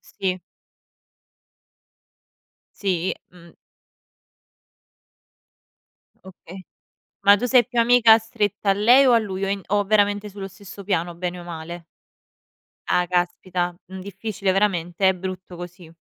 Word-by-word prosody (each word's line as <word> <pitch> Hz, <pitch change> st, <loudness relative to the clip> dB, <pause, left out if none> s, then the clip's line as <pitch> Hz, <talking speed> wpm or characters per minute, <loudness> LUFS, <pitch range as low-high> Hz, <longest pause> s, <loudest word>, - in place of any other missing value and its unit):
Sì. 190 Hz, -2 st, -4 dB, 2.4 s
Sì, 185 Hz, -3 st, -1 dB, 0.2 s
mh. 170 Hz, -2 st, -17 dB, 2.7 s
Okay, 185 Hz, -1 st, -13 dB, 0.7 s
ma 200 Hz, 0 st, +8 dB
tu 245 Hz, -, -2 dB
sei 250 Hz, -1 st, +4 dB
più 245 Hz, -1 st, -1 dB
amica 230 Hz, -1 st, +6 dB
stretta 210 Hz, -2 st, -2 dB
a -, -, +5 dB
lei 240 Hz, +7 st, +5 dB
o 255 Hz, -, +5 dB
a 235 Hz, -, +5 dB
lui 195 Hz, -3 st, -5 dB
o -, -, -3 dB
in 200 Hz, 0 st, -2 dB
o 205 Hz, +1 st, +1 dB
veramente 205 Hz, 0 st, +1 dB
sullo 195 Hz, -1 st, -7 dB
stesso 200 Hz, +1 st, -12 dB
piano 175 Hz, -3 st, -1 dB
bene 180 Hz, +1 st, -4 dB
o -, -, -9 dB
male? 170 Hz, 0 st, -8 dB, 1.0 s
Ah 180 Hz, -, +2 dB
caspita, 175 Hz, 0 st, -1 dB
mh, 190 Hz, 0 st, -8 dB
difficile 200 Hz, 0 st, -3 dB
veramente, 190 Hz, -2 st, +1 dB
è 190 Hz, -, +2 dB
brutto 185 Hz, 0 st, -7 dB
così. 175 Hz, -1 st, -11 dB
190 Hz, 125 wpm, -22 LUFS, 175-205 Hz, 2.7 s, ma